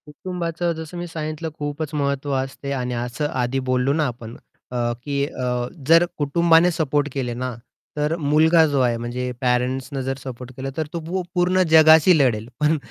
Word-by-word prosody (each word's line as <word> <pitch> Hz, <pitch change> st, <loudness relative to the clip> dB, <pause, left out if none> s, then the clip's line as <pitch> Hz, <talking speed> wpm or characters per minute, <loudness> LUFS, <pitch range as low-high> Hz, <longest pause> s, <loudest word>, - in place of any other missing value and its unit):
कुटुंबाचं 170 Hz, +2 st, -3 dB
जसं 160 Hz, +2 st, -8 dB
मी 175 Hz, 0 st, -4 dB
सांगितलं 155 Hz, 0 st, -4 dB
खूपच 145 Hz, +1 st, -4 dB
महत्त्व 140 Hz, -1 st, -1 dB
असते 135 Hz, +1 st, -4 dB
आणि 125 Hz, -2 st, -2 dB
असं 120 Hz, +5 st, -2 dB
आधी 125 Hz, +2 st, -1 dB
बोललो 130 Hz, +2 st, +2 dB
ना, 155 Hz, 0 st, +1 dB
आपण 120 Hz, -1 st, -7 dB, 0.4 s
अ, 125 Hz, -, -3 dB, 0.3 s
की 140 Hz, -1 st, -1 dB
अ, 125 Hz, -3 st, -2 dB, 0.2 s
जर 165 Hz, +2 st, +6 dB
कुटुंबाने 165 Hz, +3 st, +4 dB
सपोर्ट 145 Hz, -3 st, 0 dB
केले 125 Hz, -3 st, -2 dB
ना, 125 Hz, 0 st, -4 dB, 0.4 s
तर 150 Hz, +2 st, 0 dB
मुलगा 160 Hz, +2 st, +4 dB
जो 145 Hz, -2 st, 0 dB
आहे. 120 Hz, -2 st, +2 dB
म्हणजे 125 Hz, +2 st, -4 dB
पॅरेंट्सनं 130 Hz, +2 st, 0 dB
जर 135 Hz, 0 st, -3 dB
सपोर्ट 130 Hz, -1 st, -8 dB
केलं, 135 Hz, +1 st, -4 dB
तर 160 Hz, -2 st, -1 dB
तो 170 Hz, -, -2 dB, 0.4 s
पूर्ण 180 Hz, +1 st, +3 dB
जगाशी 160 Hz, +2 st, +7 dB
लढेल 115 Hz, -6 st, +1 dB
पण, 150 Hz, +1 st, +3 dB
145 Hz, 165 wpm, -22 LUFS, 125-160 Hz, 0.4 s, जगाशी